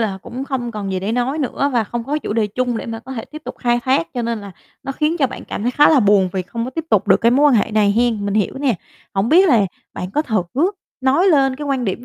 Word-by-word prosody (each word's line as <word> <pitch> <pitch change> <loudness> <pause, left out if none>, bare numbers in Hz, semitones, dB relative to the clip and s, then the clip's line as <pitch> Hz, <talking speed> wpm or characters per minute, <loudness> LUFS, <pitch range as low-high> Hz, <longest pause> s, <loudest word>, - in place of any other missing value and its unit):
là, 200 -4 -1
cũng 260 +3 -6
không 255 -4 -3
còn 200 -3 -4
gì 185 - -2
để 200 +4 -2
nói 250 +5 -1
nữa 280 0 -1
và 235 -3 +2
không 235 +2 -5
có 290 +4 -1
chủ 255 - -4
đề 220 -1 +1
chung 245 +3 -2
để - - -5
mà 225 -1 -5
có 260 +3 -9
thể 225 -4 -5
tiếp 305 0 -11
tục - - -6
khai 240 -1 +1
thác 260 -11 +2
cho 245 - -2
nên 230 -1 -2
là 200 -2 -9 0.3
nó 270 - -4
khiến 305 +4 0
cho 275 - +3
bạn 260 - -9
cảm - - -5
thấy 245 - +1
khá 295 +3 +5
là 300 -4 +5
buồn 200 -3 +4
vì 190 -1 -1
không 230 +6 -5
có 255 - -5
tiếp 325 +4 -4
tục - - +2
được - - +5
cái 230 - +4
mối 280 +4 +4
quan 280 - +4
hệ 220 0 +2
này 210 -1 +3
hén, 230 -2 +1
mình 200 - -1
hiểu 215 +4 0
nè. 270 -5 +1 0.4
Hổng 195 +4 +1
biết 365 +4 +6
là 240 -8 +5 0.3
bạn 180 - -5
có 300 - 0
thử 215 - 0 0.6
nói 265 +8 +3
lên 270 -5 +3
cái 295 - -6
quan 270 -3 -1
điểm 210 +4 -3
240 Hz, 300 wpm, -19 LUFS, 215-270 Hz, 0.6 s, biết